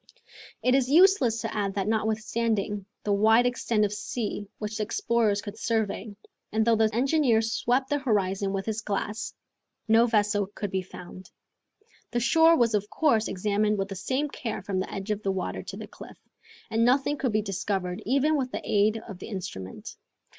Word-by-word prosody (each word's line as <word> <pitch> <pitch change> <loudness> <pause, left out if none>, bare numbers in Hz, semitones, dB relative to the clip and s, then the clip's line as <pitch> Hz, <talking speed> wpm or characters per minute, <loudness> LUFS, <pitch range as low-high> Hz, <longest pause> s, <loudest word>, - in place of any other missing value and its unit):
It 255 - +3
is 265 -1 +2
useless 295 - +5
to 225 - -4
add 200 -2 -1
that 195 -1 -1
notwithstanding 215 -2 -1 0.2
the 205 - +1
wide 220 +4 +5
extent 235 -3 +1
of 205 - -3
sea 210 -1 -4
which 210 0 -4
the 215 - 0
explorers 210 -1 0
could 205 - -8
survey, 220 -2 -2 0.4
and 220 0 +1
though 230 -1 +4
the 220 0 +3
engineer 250 -1 +2
swept 245 +4 0
the 290 - +2
horizon 200 -6 0
with 195 0 -3
his 220 0 -2
glass, 210 +1 -3 0.5
no 225 +2 +5
vessel 205 -2 +1
could 205 -3 -4
be 190 - 0
found. 185 0 -11 0.8
The 240 - -1
shore 325 +6 +5
was 230 -4 +2
of 210 0 0
course 230 -9 +2
examined 210 +2 0
with 195 0 -2
the 195 - -5
same 260 +9 -1
care 235 -8 -5
from 190 -1 -2
the 185 - -4
edge 195 +2 -4
of 210 0 -2
the 195 - 0
water 190 -2 -3
to - - -8
the - - -6
cliff, - - -12 0.5
and 225 +1 +2
nothing 270 +4 +2
could 255 - 0
be 215 0 +1
discovered 190 -2 -2
even 280 +7 +2
with 260 -3 -1
the - - -5
aid 210 +2 +2
of 195 -5 -9
the - - -8
instrument. 175 - -7
215 Hz, 185 wpm, -27 LUFS, 200-240 Hz, 0.8 s, useless